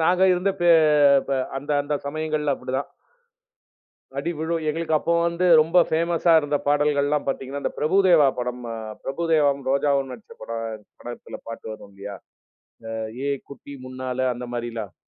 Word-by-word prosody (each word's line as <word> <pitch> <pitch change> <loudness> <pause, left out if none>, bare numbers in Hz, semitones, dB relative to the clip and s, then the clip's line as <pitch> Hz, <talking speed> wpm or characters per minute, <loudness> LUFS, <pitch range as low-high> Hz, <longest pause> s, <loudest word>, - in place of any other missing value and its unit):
நாங்க 180 +3 +3
இருந்த 180 +2 +1
பே 175 - +5 0.6
ப 135 -1 +1 0.2
அந்த 140 +2 -6
அந்த 150 +1 -2
சமயங்கள்ல 155 -1 -1
அப்படிதான். 130 +1 -4 1.3
அடி 155 +5 -1
விழும். 165 +1 -1
எங்களுக்கு 160 0 0
அப்போ 170 - -1
வந்து 170 +2 0
ரொம்ப 165 +3 +3
பேமஸ்ஸா 170 +1 +2
இருந்த 145 -1 -1
பாடல்கள்லாம் 145 0 +2
பாத்தீங்கன்னா, 135 +1 -3
இந்த - - -2
பிரபுதேவா 170 -2 +5
படம் 125 0 -3
அ - - -4 0.3
பிரபுதேவாவும், 145 -2 +1
ரோஜாவும் 140 -1 +1
நடிச்ச 115 -4 -12
படம், 115 -2 -5 0.2
படத்தில 120 0 -8
பாட்டு 115 - -8
வரும் 100 -2 -12
இல்லையா? 100 0 -8 0.7
இந்த 115 - -4 0.3
"ஏய் 140 -2 -1
குட்டி 140 +1 -10
முன்னால" 130 0 -2
அந்த 125 +1 -7
மாரில்லாம். 115 -5 -5
140 Hz, 145 wpm, -24 LUFS, 130-160 Hz, 1.3 s, பே